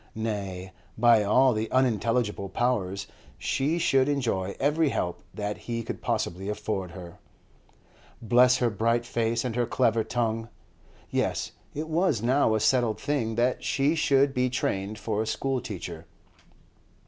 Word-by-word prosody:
Nay, 100 Hz, -4 st, -4 dB, 0.2 s
by 115 Hz, -1 st, +5 dB
all 130 Hz, +5 st, +4 dB
the 110 Hz, +1 st, -2 dB
unintelligible 115 Hz, -5 st, +1 dB
Powers, 100 Hz, -4 st, -1 dB, 0.3 s
she 150 Hz, +5 st, 0 dB
should 135 Hz, -4 st, +3 dB
enjoy 115 Hz, -9 st, -1 dB
every 150 Hz, +2 st, +2 dB
help 90 Hz, -9 st, -2 dB
that 105 Hz, -1 st, -4 dB
he 115 Hz, -1 st, -2 dB
could -, -, -6 dB
possibly 95 Hz, +3 st, -2 dB
afford 105 Hz, -3 st, -3 dB
her. 85 Hz, -1 st, -10 dB, 1.0 s
Bless 125 Hz, +2 st, +4 dB
her 120 Hz, -2 st, +1 dB
bright 115 Hz, +3 st, +1 dB
face 115 Hz, 0 st, -1 dB
and 120 Hz, -3 st, -2 dB
her 120 Hz, -1 st, +1 dB
clever 115 Hz, -3 st, +2 dB
tongue! 115 Hz, 0 st, -2 dB, 0.6 s
Yes, -, -, -1 dB, 0.2 s
it 155 Hz, +2 st, -3 dB
was 160 Hz, -, +1 dB
now 125 Hz, -2 st, +3 dB
a -, -, +1 dB
settled 120 Hz, -1 st, +2 dB
thing 135 Hz, -6 st, -1 dB
that 120 Hz, +2 st, +1 dB
she 140 Hz, +3 st, +1 dB
should 140 Hz, -3 st, +3 dB
be 125 Hz, 0 st, +1 dB
trained 100 Hz, -4 st, -2 dB
for 110 Hz, -1 st, -2 dB
a 110 Hz, -, -3 dB
schoolteacher. 120 Hz, -, -3 dB
115 Hz, 140 wpm, -27 LUFS, 105-130 Hz, 1.0 s, by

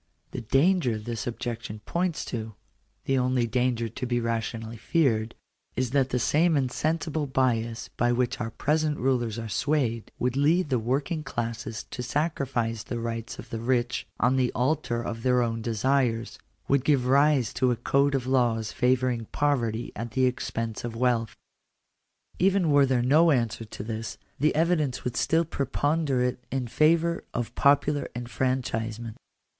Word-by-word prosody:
The -, -, -4 dB
danger 135 Hz, -, +2 dB
this 115 Hz, +2 st, -5 dB
objection 115 Hz, -3 st, -4 dB
points 175 Hz, -1 st, -1 dB
to 110 Hz, -3 st, -5 dB, 0.2 s
— -, -, -43 dB
the 135 Hz, -1 st, +2 dB
only 125 Hz, -1 st, +1 dB
danger 120 Hz, 0 st, 0 dB
to 115 Hz, +3 st, -5 dB
be 120 Hz, 0 st, +1 dB
rationally 115 Hz, 0 st, -3 dB
feared 115 Hz, -4 st, +1 dB, 0.2 s
— -, -, -46 dB
is 125 Hz, -2 st, -1 dB
that 135 Hz, -1 st, +2 dB
the 125 Hz, -, 0 dB
same 155 Hz, +6 st, +3 dB
insensible 155 Hz, +3 st, -1 dB
bias 125 Hz, -3 st, 0 dB
by 120 Hz, 0 st, +2 dB
which 125 Hz, 0 st, 0 dB
our 115 Hz, -, -2 dB
present 150 Hz, +4 st, 0 dB
rulers 120 Hz, -4 st, 0 dB
are 115 Hz, -1 st, -4 dB
swayed, 115 Hz, -1 st, -1 dB
would 125 Hz, 0 st, -1 dB
lead 155 Hz, +4 st, +3 dB
the 125 Hz, -, +3 dB
working 135 Hz, +8 st, -1 dB
classes 115 Hz, -4 st, -4 dB
to -, -, -4 dB
sacrifice 125 Hz, -5 st, -1 dB
the 120 Hz, +2 st, -5 dB
rights 115 Hz, 0 st, -4 dB
of -, -, -11 dB
the 115 Hz, -, -3 dB
rich 120 Hz, +1 st, 0 dB
on 125 Hz, +2 st, +3 dB
the 125 Hz, -1 st, +2 dB
altar 125 Hz, -2 st, 0 dB
of 115 Hz, -1 st, -5 dB
their 125 Hz, 0 st, +3 dB
own 115 Hz, -1 st, -2 dB
desires 115 Hz, +1 st, 0 dB
— -, -, -41 dB
would 140 Hz, -2 st, +2 dB
give 135 Hz, -3 st, +2 dB
rise 140 Hz, -1 st, +3 dB
to 130 Hz, -, +2 dB
a 120 Hz, -, +2 dB
code 140 Hz, +4 st, +2 dB
of 130 Hz, -2 st, -1 dB
laws 120 Hz, -4 st, +1 dB
favouring 125 Hz, -2 st, +1 dB
poverty 120 Hz, -5 st, -1 dB
at 115 Hz, +1 st, -5 dB
the 130 Hz, -1 st, +3 dB
expense 115 Hz, -3 st, -2 dB
of 120 Hz, -1 st, -5 dB
wealth. 115 Hz, -2 st, +1 dB, 1.0 s
Even 190 Hz, -3 st, +3 dB
were 140 Hz, -1 st, +5 dB
there 125 Hz, -2 st, +2 dB
no 155 Hz, +7 st, +5 dB
answer 115 Hz, -5 st, 0 dB
to 105 Hz, -, -8 dB
this, 110 Hz, 0 st, -5 dB, 0.2 s
the 150 Hz, +2 st, +2 dB
evidence 155 Hz, -5 st, +1 dB
would 125 Hz, -1 st, -3 dB
still 165 Hz, +5 st, +2 dB
preponderate 140 Hz, -4 st, 0 dB
in 135 Hz, -2 st, -1 dB
favour 165 Hz, +6 st, +2 dB
of 120 Hz, -2 st, -2 dB
popular 145 Hz, +1 st, +2 dB
enfranchisement. 120 Hz, -2 st, -2 dB
125 Hz, 160 wpm, -27 LUFS, 115-140 Hz, 1.0 s, were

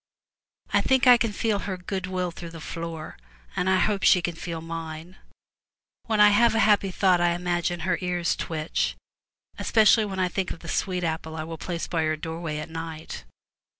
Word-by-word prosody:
I -, -, +4 dB
think 265 Hz, -1 st, +3 dB
I 250 Hz, -1 st, +9 dB
can 235 Hz, -2 st, 0 dB
feel 210 Hz, 0 st, 0 dB
her 190 Hz, -2 st, -4 dB
good 185 Hz, +1 st, -4 dB
will 180 Hz, -1 st, -2 dB
through 170 Hz, 0 st, -8 dB
the 165 Hz, 0 st, -10 dB
floor, 165 Hz, 0 st, -6 dB, 0.4 s
and 185 Hz, -, 0 dB
I 190 Hz, -, +4 dB
hope 200 Hz, 0 st, +1 dB
she 180 Hz, -, +6 dB
can 170 Hz, -1 st, -4 dB
mine. 165 Hz, +2 st, -7 dB, 0.9 s
When 220 Hz, -1 st, +1 dB
I 210 Hz, 0 st, +8 dB
have 225 Hz, +3 st, +4 dB
a -, -, +3 dB
happy 205 Hz, -2 st, +3 dB
thought 185 Hz, -1 st, +3 dB
I 175 Hz, 0 st, +3 dB
imagine 175 Hz, 0 st, -1 dB
her 185 Hz, -1 st, 0 dB
ears 180 Hz, -1 st, 0 dB
twitch, 155 Hz, -1 st, -2 dB, 0.6 s
especially 220 Hz, 0 st, +4 dB
when 195 Hz, -2 st, -5 dB
I 185 Hz, -1 st, +2 dB
think 185 Hz, +1 st, -2 dB
of 165 Hz, -, -7 dB
the -, -, -10 dB
sweet 180 Hz, -2 st, -1 dB
apple 160 Hz, -1 st, -3 dB
I 155 Hz, -, -4 dB
will 165 Hz, 0 st, -7 dB
place 170 Hz, -2 st, -3 dB
by 165 Hz, -2 st, -1 dB
her 155 Hz, 0 st, +1 dB
doorway 160 Hz, 0 st, -5 dB
at 155 Hz, +2 st, -6 dB
night. 160 Hz, -, -7 dB
175 Hz, 190 wpm, -26 LUFS, 165-195 Hz, 0.9 s, I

